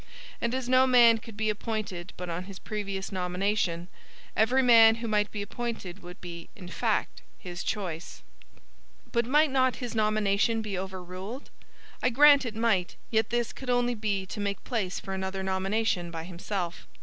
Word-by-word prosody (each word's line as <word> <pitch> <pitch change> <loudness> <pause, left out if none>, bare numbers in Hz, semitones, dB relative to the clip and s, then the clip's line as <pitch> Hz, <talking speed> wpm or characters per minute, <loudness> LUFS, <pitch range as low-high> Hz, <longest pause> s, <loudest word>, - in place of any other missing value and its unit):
And 235 +2 0
as 260 -2 -3
no 255 +1 +5
man 235 -3 +6
could 225 -2 -12
be 215 0 +1
appointed 205 -5 -4
but 180 - -5
on 175 +2 -4
his 195 -1 -9
previous 200 -2 -4
nomination, 180 -1 -1 0.5
every 250 +5 +3
man 225 -2 +8
who 230 0 -5
might 210 -1 +1
be 205 -1 -4
appointed 205 -4 -5
would 180 0 -10
be, 170 -1 -8
in 180 -3 -10
fact, 220 +3 -1 0.2
his 175 -1 -7
choice. 180 -5 -4 0.9
But 235 -1 +1
might 300 +2 +4
not 260 -1 +3
his 245 -2 -5
nomination 215 0 +2
be 205 -2 -3
overruled? 190 +6 -6 0.5
I 250 - +3
grant 285 +1 +6
it 220 - -5
might, 220 -6 +1 0.2
yet 220 -1 +2
this 240 -1 -1
could 265 - -8
only 245 0 +2
be 210 -4 -1
to 200 - -7
make 200 -2 -2
place 205 -7 -2
for 195 - -6
another 190 0 -3
nomination 190 -1 0
by 165 -1 -5
himself. 175 0 -5
210 Hz, 170 wpm, -28 LUFS, 185-235 Hz, 0.9 s, man